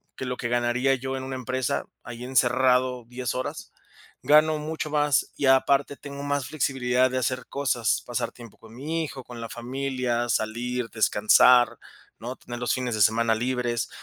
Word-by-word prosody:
que 130 Hz, -, -5 dB
lo 125 Hz, 0 st, -3 dB
que 120 Hz, -, -3 dB
ganaría 120 Hz, +2 st, +1 dB
yo 130 Hz, +1 st, -4 dB
en 130 Hz, -, -5 dB
una 130 Hz, 0 st, -5 dB
empresa, 130 Hz, -1 st, -2 dB, 0.2 s
ahí 120 Hz, 0 st, -8 dB
encerrado 125 Hz, 0 st, +2 dB
10 125 Hz, 0 st, -4 dB
horas. 130 Hz, -, -5 dB, 0.5 s
Gano 155 Hz, +1 st, +5 dB
mucho 155 Hz, +1 st, -4 dB
más, 150 Hz, -2 st, +1 dB
y -, -, -1 dB
aparte 135 Hz, +1 st, +3 dB
tengo 140 Hz, 0 st, -8 dB
más 145 Hz, -2 st, -1 dB
flexibilidad 130 Hz, -3 st, +1 dB
de 130 Hz, -, -1 dB
hacer 130 Hz, 0 st, -2 dB
cosas, 125 Hz, -5 st, 0 dB
pasar 120 Hz, -1 st, -2 dB
tiempo 120 Hz, -4 st, -14 dB
con 110 Hz, 0 st, -16 dB
mi 160 Hz, +6 st, -2 dB
hijo, 135 Hz, -4 st, -7 dB
con 120 Hz, -1 st, -10 dB
la 115 Hz, -, -6 dB
familia, 125 Hz, 0 st, -2 dB
salir, 120 Hz, +2 st, -2 dB
descansar, 115 Hz, +3 st, +4 dB, 0.4 s
¿no? 120 Hz, +3 st, -6 dB
tener 120 Hz, -1 st, -8 dB
los 125 Hz, -, 0 dB
fines 125 Hz, -3 st, -2 dB
de 110 Hz, -, -1 dB
semana 115 Hz, +2 st, +3 dB
libres. 120 Hz, 0 st, -1 dB
125 Hz, 170 wpm, -25 LUFS, 120-135 Hz, 0.5 s, Gano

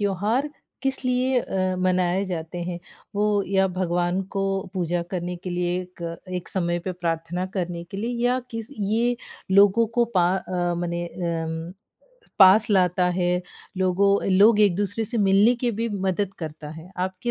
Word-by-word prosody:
त्योहार 210 Hz, +8 st, 0 dB, 0.3 s
किस 270 Hz, -1 st, -1 dB
लिए 255 Hz, +1 st, +2 dB
अ, 185 Hz, -3 st, -1 dB
मनाए 185 Hz, +1 st, +1 dB
जाते 175 Hz, -2 st, -5 dB
हैं? 175 Hz, 0 st, -4 dB, 0.4 s
वो 205 Hz, 0 st, +2 dB
या 190 Hz, 0 st, +2 dB
भगवान 180 Hz, 0 st, 0 dB
को 195 Hz, -, 0 dB, 0.3 s
पूजा 175 Hz, -1 st, -1 dB
करने 180 Hz, -2 st, -3 dB
के 180 Hz, +1 st, -7 dB
लिए 175 Hz, 0 st, -1 dB
एक 180 Hz, -1 st, -11 dB, 0.3 s
एक 180 Hz, -1 st, -4 dB
समय 175 Hz, -2 st, -1 dB
पे 185 Hz, +2 st, -4 dB
प्रार्थना 170 Hz, +1 st, -2 dB
करने 175 Hz, -2 st, -2 dB
के 190 Hz, +3 st, -9 dB
लिए 225 Hz, +4 st, -2 dB
या 250 Hz, +1 st, +3 dB
किस 225 Hz, -1 st, -6 dB
ये 230 Hz, +4 st, +1 dB, 0.3 s
लोगों 200 Hz, +4 st, +5 dB
को 240 Hz, -, +6 dB
पा 175 Hz, -1 st, +5 dB
अ, 175 Hz, -2 st, -2 dB
मने 175 Hz, 0 st, -2 dB
अम 165 Hz, -1 st, -4 dB, 0.7 s
पास 200 Hz, +3 st, +7 dB
लाता 180 Hz, -2 st, +3 dB
है। 175 Hz, 0 st, +1 dB, 0.5 s
लोगों 190 Hz, +2 st, +3 dB, 0.2 s
लोग 210 Hz, +3 st, +6 dB
एक-दूसरे 205 Hz, +2 st, +2 dB
से 230 Hz, +2 st, -3 dB
मिलने 200 Hz, +4 st, +5 dB
की 240 Hz, -, +3 dB
भी 230 Hz, -, 0 dB, 0.2 s
मदद 190 Hz, +1 st, -1 dB
करता 155 Hz, -2 st, -7 dB
है। 160 Hz, +3 st, -11 dB
आपकी 185 Hz, +5 st, -2 dB
185 Hz, 160 wpm, -24 LUFS, 175-205 Hz, 0.7 s, पास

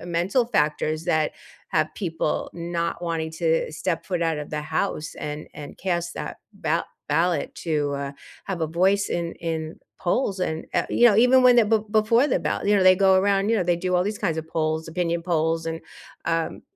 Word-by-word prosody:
uh, -, -, -9 dB
mental 175 Hz, +8 st, +1 dB
factors 155 Hz, -5 st, 0 dB
that 155 Hz, -1 st, +1 dB, 0.4 s
have 155 Hz, 0 st, 0 dB
people 165 Hz, -5 st, -2 dB
not 170 Hz, 0 st, -3 dB
wanting 165 Hz, -2 st, -2 dB
to 160 Hz, -1 st, 0 dB
step 165 Hz, +1 st, -2 dB
foot 180 Hz, -3 st, -1 dB
out 165 Hz, -2 st, 0 dB
of 150 Hz, -, -6 dB
the 150 Hz, 0 st, -2 dB
house 155 Hz, -1 st, -2 dB
and 150 Hz, 0 st, -6 dB
and 145 Hz, -1 st, -9 dB
cast 175 Hz, -2 st, -2 dB
that -, -, -6 dB
ba 165 Hz, -4 st, -1 dB, 0.2 s
ballot 165 Hz, +4 st, +1 dB
to, 150 Hz, -4 st, -1 dB
uh, 140 Hz, 0 st, -4 dB, 0.3 s
have 190 Hz, -4 st, -4 dB
a 160 Hz, -, +1 dB
voice 190 Hz, +5 st, +2 dB
in 170 Hz, -1 st, -2 dB
in 160 Hz, -1 st, -3 dB, 0.2 s
polls, 195 Hz, +1 st, 0 dB
and, 160 Hz, -3 st, -2 dB
uh, -, -, +2 dB
you 240 Hz, -, +5 dB
know, 215 Hz, -4 st, +5 dB
even 250 Hz, +3 st, +6 dB
when 250 Hz, -1 st, +7 dB
the 235 Hz, -, +6 dB
be 220 Hz, +1 st, +3 dB
before 220 Hz, +4 st, +4 dB
the -, -, +2 dB
ballot, -, -, -2 dB
you 205 Hz, -, +5 dB
know, 195 Hz, -, +3 dB
they 185 Hz, -, +8 dB
go 195 Hz, -1 st, +5 dB
around, 195 Hz, +1 st, +2 dB
you 230 Hz, -, +3 dB
know, 190 Hz, -, +1 dB
they 175 Hz, 0 st, +2 dB
do 180 Hz, +1 st, -1 dB
all 180 Hz, -, +2 dB
these 210 Hz, +1 st, -3 dB
kinds 170 Hz, -6 st, -1 dB
of 160 Hz, -, -5 dB
polls, 160 Hz, 0 st, -1 dB
opinion 170 Hz, 0 st, -1 dB
polls, 165 Hz, -1 st, 0 dB
and, 165 Hz, 0 st, -3 dB, 0.4 s
um, 165 Hz, -1 st, -1 dB
170 Hz, 210 wpm, -24 LUFS, 160-195 Hz, 0.4 s, they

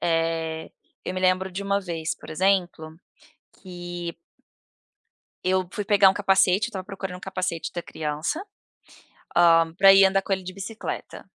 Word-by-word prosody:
eh, 165 Hz, -1 st, -1 dB, 0.3 s
eu 185 Hz, -, -4 dB
me 185 Hz, -, -3 dB
lembro 185 Hz, +1 st, +2 dB
de 190 Hz, +2 st, -5 dB
uma 200 Hz, 0 st, 0 dB
vez, 165 Hz, -4 st, -3 dB
por -, -, -13 dB
exemplo, 175 Hz, -2 st, 0 dB, 0.7 s
que 175 Hz, -2 st, -6 dB, 1.3 s
eu 185 Hz, 0 st, +1 dB
fui 205 Hz, -, -4 dB
pegar 200 Hz, -1 st, +6 dB
um -, -, +1 dB
capacete, 195 Hz, +1 st, +3 dB
eu -, -, -8 dB
estava 190 Hz, -5 st, -6 dB
procurando 190 Hz, -2 st, -6 dB
um -, -, -13 dB
capacete 185 Hz, -3 st, -3 dB
da 175 Hz, -, -3 dB
criança, 155 Hz, -, -3 dB, 0.9 s
hã, 165 Hz, -1 st, +5 dB
para 195 Hz, 0 st, +8 dB
ir 195 Hz, 0 st, +7 dB
andar 195 Hz, 0 st, +2 dB
com 195 Hz, -, -8 dB
ele 190 Hz, -1 st, -3 dB
de 185 Hz, 0 st, -7 dB
bicicleta. 215 Hz, +3 st, -7 dB
185 Hz, 160 wpm, -24 LUFS, 170-195 Hz, 1.3 s, para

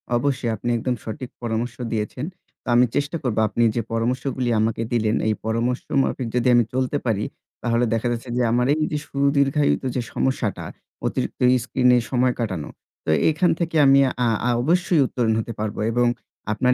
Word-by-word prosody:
অবশ্যই 130 Hz, -1 st, 0 dB
আপনি 115 Hz, +3 st, -4 dB
একদম 125 Hz, +2 st, -1 dB
সঠিক 125 Hz, +3 st, -6 dB
পরামর্শ 115 Hz, 0 st, -2 dB, 0.2 s
দিয়েছেন। 115 Hz, +4 st, -3 dB, 0.4 s
তা -, -, -21 dB
আমি 125 Hz, +1 st, +6 dB
চেষ্টা 145 Hz, +4 st, 0 dB
করব 125 Hz, -5 st, -1 dB
আপনি 115 Hz, +3 st, 0 dB
যে, 120 Hz, -, +1 dB
পরামর্শগুলি 125 Hz, +2 st, -1 dB
আমাকে 110 Hz, +1 st, 0 dB
দিলেন 110 Hz, -2 st, +1 dB
এই 110 Hz, -, +3 dB
পরামর্শ 115 Hz, +3 st, 0 dB, 0.2 s
মাফিক 130 Hz, -2 st, -2 dB
যদি 125 Hz, 0 st, +2 dB
আমি 120 Hz, -, +5 dB
চলতে 130 Hz, +2 st, 0 dB
পারি। 105 Hz, -3 st, 0 dB, 0.4 s
তাহলে 120 Hz, 0 st, +2 dB
দেখা 115 Hz, +1 st, 0 dB
যাচ্ছে 120 Hz, +1 st, -4 dB
যে -, -, +2 dB
আমার 125 Hz, +1 st, +2 dB
এই 155 Hz, -, -1 dB
যে 150 Hz, -, 0 dB
সুদীর্ঘায়িত 140 Hz, +1 st, +2 dB
যে 125 Hz, -, +1 dB
সমস্যাটা, 130 Hz, -5 st, -1 dB, 0.4 s
অতিরিক্ত -, -, -2 dB, 0.2 s
স্ক্রিনে 125 Hz, 0 st, +3 dB
সময় 125 Hz, 0 st, +2 dB
কাটানো, 95 Hz, -10 st, -3 dB, 0.4 s
তো -, -, -3 dB, 0.2 s
এখান 160 Hz, +3 st, +2 dB
থেকে 165 Hz, -1 st, -2 dB
আমি, 135 Hz, 0 st, +6 dB, 0.3 s
আ -, -, +3 dB, 0.2 s
আ -, -, +2 dB
অবশ্যই 170 Hz, +2 st, +2 dB
উত্তরণ 115 Hz, -3 st, 0 dB
হতে 115 Hz, +1 st, -4 dB
পারবো 105 Hz, -1 st, -3 dB
এবং 120 Hz, +1 st, +2 dB, 0.5 s
আপনার 125 Hz, +3 st, +2 dB
125 Hz, 170 wpm, -23 LUFS, 115-135 Hz, 0.5 s, আমি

